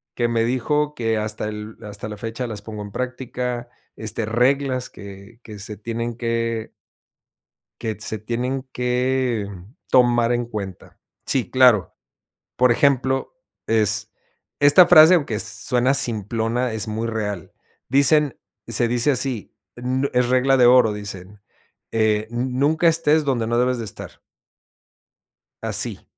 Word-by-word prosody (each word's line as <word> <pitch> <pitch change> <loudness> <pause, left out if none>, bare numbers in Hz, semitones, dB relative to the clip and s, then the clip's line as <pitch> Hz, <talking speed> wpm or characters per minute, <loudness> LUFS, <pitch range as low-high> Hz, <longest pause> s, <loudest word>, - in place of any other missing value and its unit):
que 120 - 0
me 115 -1 0
dijo, 150 +5 0
que 115 -2 -1
hasta 105 0 -3
el 105 +1 -8
hasta 105 0 -7
la 105 -1 -7
fecha 115 +4 -5
las 105 -3 -7
pongo 105 -1 -7
en 105 - -9
práctica, 125 0 -4 0.3
este, 110 0 -3
reglas 130 +3 0
que 100 +3 -12
que 105 -2 -10
se 105 +2 -6
tienen 115 +3 -4
que. 115 -1 -2 1.1
Que 110 -1 -3
se 110 0 -3
tienen 125 +4 -3
que 125 -2 -1 0.4
tomar 120 -1 +4
en 120 0 -1
cuenta. 100 -5 -8 0.3
Sí, 130 -3 +1
claro. 125 -8 +4 0.6
Por 125 -1 +4
ejemplo, 135 - +1 0.3
es 110 -3 +2 0.5
esta 145 +5 +7
frase, 160 +3 +8
aunque 140 -11 0
suena 125 +5 0
simplona, 115 0 -1
es 110 0 -2
muy 110 +2 -3
real. 105 -5 -4 0.4
Dicen, 140 +1 +4 0.3
se 120 - +2
dice 120 +4 +2
así, 125 -4 -3 0.2
n 130 +3 -1
es 125 -1 +2
regla 130 +1 +3
de 125 - +5
oro, 125 -3 +5
dicen, 100 -1 -8 0.5
eh: 110 -1 +1
"Nunca 130 +7 +1
estés 160 -2 +3
donde 125 -5 0
no 120 +1 0
debes 125 0 +1
de 115 - -4
estar". 100 - -8 1.4
Así. - - -1
120 Hz, 135 wpm, -21 LUFS, 110-130 Hz, 1.4 s, frase